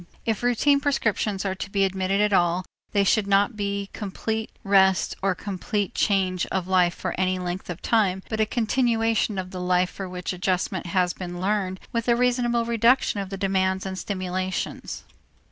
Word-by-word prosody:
If 220 -3 0
routine 245 +4 +3
prescriptions 215 -8 0
are 190 - 0
to 190 - -6
be 195 0 +1
admitted 190 +1 0
at 210 -1 +2
all, 175 0 +2 0.3
they 200 - +3
should 200 +1 +2
not 200 +3 +3
be 200 -1 -3
complete 220 +2 -3
rest 190 -1 +3
or 190 -1 +1
complete 200 +2 -3
change 185 -3 +1
of 185 -2 -2
life 180 -2 +3
for - - -3
any 185 0 +1
length 180 +1 -4
of 175 0 -6
time 190 -5 +2
but 220 - -3
a 215 - +3
continuation 225 -2 +1
of 185 -1 -4
the 185 -2 -5
life 180 0 +2
for 195 -2 -6
which 180 0 -4
adjustment 180 0 -1
has 180 0 +1
been 175 -1 -6
learned 190 -1 -1
with 230 0 -2
a 235 - +5
reasonable 240 -1 +1
reduction 235 -1 +3
of 195 -1 -4
the 195 - -5
demands 190 -1 0
and 190 0 -4
stimulations. 185 -1 -3
195 Hz, 180 wpm, -25 LUFS, 185-220 Hz, 0.3 s, a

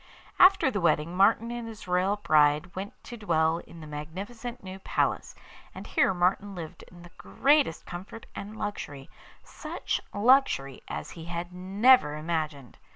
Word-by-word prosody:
After 370 -7 +6
the 205 -4 -2
wedding 165 +1 +1
Martin 220 +4 +3
and 240 -1 -5
his 220 -3 -10
royal 180 +3 +1
bride 155 -2 +2
went 195 +2 -5
to 240 - -9
dwell 165 -5 +1
in 170 -1 -13
the - - -9
magnificent 195 +12 -7
new 190 0 -8
palace, - - -1 0.4
and - - -8
here - - +2
Martin 190 +2 0
lived 165 0 -8
in 175 0 -15
the 175 - -14
greatest 280 - +2
comfort 190 +6 -9
and 210 +2 -8
luxury, 145 -11 -6 0.3
such - - -4
luxury 205 - +2
as - - -6
he 165 -2 -9
had 175 +1 -5
never 195 - +4
imagined. 155 -4 -4
180 Hz, 155 wpm, -28 LUFS, 160-215 Hz, 0.4 s, After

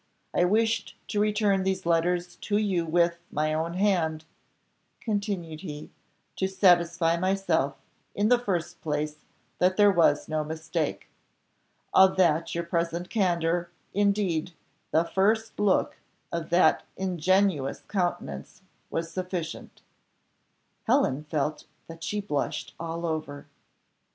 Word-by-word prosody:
I 175 - +3
wished 220 +2 +1
to 205 - -1
return 210 -2 +2
these 190 -1 -1
letters 175 +1 +1
to 205 - -1
you 190 -6 0
with, 170 +1 +2
my 155 +1 0
own 165 +2 -2
hand," 170 -5 +1 0.7
continued 200 -7 -3
he, 150 -4 -8 0.5
"to 190 - +1
satisfy 175 -3 +3
myself, 180 -6 +1 0.4
in 205 +1 +2
the 245 +1 +5
first 175 -6 -3
place, 150 0 -3 0.3
that 185 +1 +3
there 205 -1 +6
was 165 -5 +3
no 155 -1 -1
mistake. 160 0 -3 0.9
Of 190 0 +6
that 165 -2 +2
your 170 - -1
present 170 +1 -2
candour, 175 -4 +1 0.2
indeed, 195 -5 +1 0.4
the 160 - +3
first 210 +6 0
look 205 -2 +2 0.3
of 170 -2 -3
that 175 +2 +4 0.2
ingenuous 185 -5 +1
countenance, 175 - -3 0.3
was 165 0 -3
sufficient." 180 -3 -5 1.0
Helen 140 +4 +2
felt 150 0 -2 0.2
that 165 0 -11
she 210 0 -2
blushed 150 -8 -3
all 165 0 -4
over. 155 -3 -4
175 Hz, 120 wpm, -27 LUFS, 160-190 Hz, 1.0 s, there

